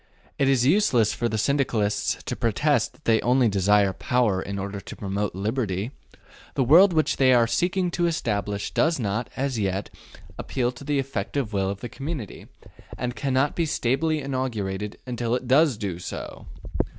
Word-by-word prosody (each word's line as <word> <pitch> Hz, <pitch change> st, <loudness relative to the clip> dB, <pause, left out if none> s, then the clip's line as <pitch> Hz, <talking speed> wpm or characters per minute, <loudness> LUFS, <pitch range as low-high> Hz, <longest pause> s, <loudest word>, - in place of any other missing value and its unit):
It 135 Hz, -1 st, +3 dB
is 130 Hz, -3 st, +3 dB
useless 135 Hz, -, +3 dB
for 120 Hz, -, -1 dB
the 110 Hz, -, -2 dB
Syndicalists 115 Hz, -5 st, 0 dB
to -, -, -4 dB
protest -, -, +1 dB
that -, -, -26 dB
they 110 Hz, -1 st, +3 dB
only 125 Hz, 0 st, +3 dB
desire 100 Hz, 0 st, +3 dB
power 110 Hz, -4 st, +1 dB
in 100 Hz, +1 st, -5 dB
order 100 Hz, +1 st, -4 dB
to -, -, -9 dB
promote 100 Hz, -1 st, -3 dB
liberty: 105 Hz, 0 st, -2 dB, 0.6 s
the 135 Hz, -, +2 dB
world 175 Hz, +10 st, +7 dB
which 155 Hz, -2 st, +1 dB
they 130 Hz, -1 st, +5 dB
are 120 Hz, -1 st, +5 dB
seeking 180 Hz, +7 st, 0 dB
to 175 Hz, 0 st, +1 dB
establish 105 Hz, -10 st, -2 dB
does 160 Hz, -2 st, +2 dB
not, 110 Hz, +1 st, -2 dB
as 135 Hz, -3 st, -1 dB
yet, 95 Hz, -1 st, -2 dB, 0.5 s
appeal 125 Hz, -2 st, -1 dB
to 125 Hz, +2 st, -12 dB
the 145 Hz, 0 st, 0 dB
effective 130 Hz, -2 st, -2 dB
will 95 Hz, -1 st, 0 dB
of 100 Hz, 0 st, -5 dB
the -, -, -4 dB
community, 135 Hz, -, -6 dB, 0.5 s
and 125 Hz, 0 st, -3 dB
cannot 135 Hz, +4 st, 0 dB
be 165 Hz, -2 st, 0 dB
stably 150 Hz, +4 st, 0 dB
inaugurated 110 Hz, -7 st, -3 dB
until 120 Hz, -1 st, -1 dB
it 125 Hz, 0 st, -4 dB
does 135 Hz, -1 st, +4 dB
do 95 Hz, -5 st, -4 dB
so. -, -, -7 dB
120 Hz, 170 wpm, -25 LUFS, 105-135 Hz, 0.6 s, world